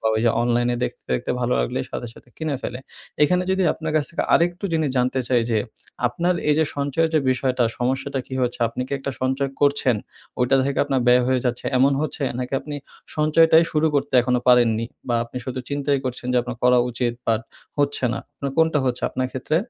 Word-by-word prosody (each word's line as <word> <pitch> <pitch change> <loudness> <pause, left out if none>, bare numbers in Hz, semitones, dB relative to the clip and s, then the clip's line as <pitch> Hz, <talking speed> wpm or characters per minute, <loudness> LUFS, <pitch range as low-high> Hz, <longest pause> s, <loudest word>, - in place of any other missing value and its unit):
বা 110 - +1 0.2
যে 115 - +5
অনলাইনে 120 0 +1
দেখতে, - - -6
দেখতে 60 - -1
ভালো - - 0
লাগলেই - - -2
সাথে 120 - -5
সাথে - - -17
কিনে 155 -4 -2
ফেলে। 125 - -4 0.4
এখানে 180 +4 +3
যদি 190 0 +2
আপনার 155 -1 -4
কাছ 150 - +2
থেকে 170 - -1
আরেকটু 175 +3 +1
জিনিস 155 -4 +1
জানতে 125 +1 +1
চাই 125 -2 +3
যে 110 - +2 0.5
আপনার 175 +8 0
এই 150 - +5
যে 160 - +4
সঞ্চয়ের 145 +3 0
যে 155 - +4
বিষয়টা 130 -1 +1
সমস্যাটা 135 +2 -1
কী 130 - -7
হচ্ছে 125 0 -1
আপনি 125 - -4
কী - - -9
একটা 140 - -4
সঞ্চয় 130 +1 0
করছেন 140 -4 +3 0.4
ওইটা 125 +2 +3
থেকে 140 - -1
আপনার 135 -2 0
ব্যয় 125 0 +6
হয়ে 130 -1 +2
যাচ্ছে 125 -1 -1
এমন 135 +2 +4
হচ্ছে 155 -1 -3 0.2
নাকি 125 +1 -4
আপনি 150 -1 -6 0.4
সঞ্চয়টাই 160 +2 +5
শুরু 155 +1 +2
করতে 145 0 0
এখনো 125 0 +1
পারেননি 115 -2 +4 0.2
বা 120 - +1
আপনি 115 - -12
শুধু 130 +1 -4
চিন্তাই 140 -1 0
করছেন 125 -1 -4
যে 125 - +2
আপনার 120 -1 -6
করা 125 0 +5
উচিত 120 0 -1
বাট 110 -1 +2 0.4
হচ্ছে 145 -2 +1
না - - -3 0.2
আপনার 140 - -4
কোনটা 160 -2 +4
হচ্ছে 125 -1 -1
আপনার 130 - -1
ক্ষেত্রে? 140 +4 -1
130 Hz, 205 wpm, -22 LUFS, 125-150 Hz, 0.5 s, ব্যয়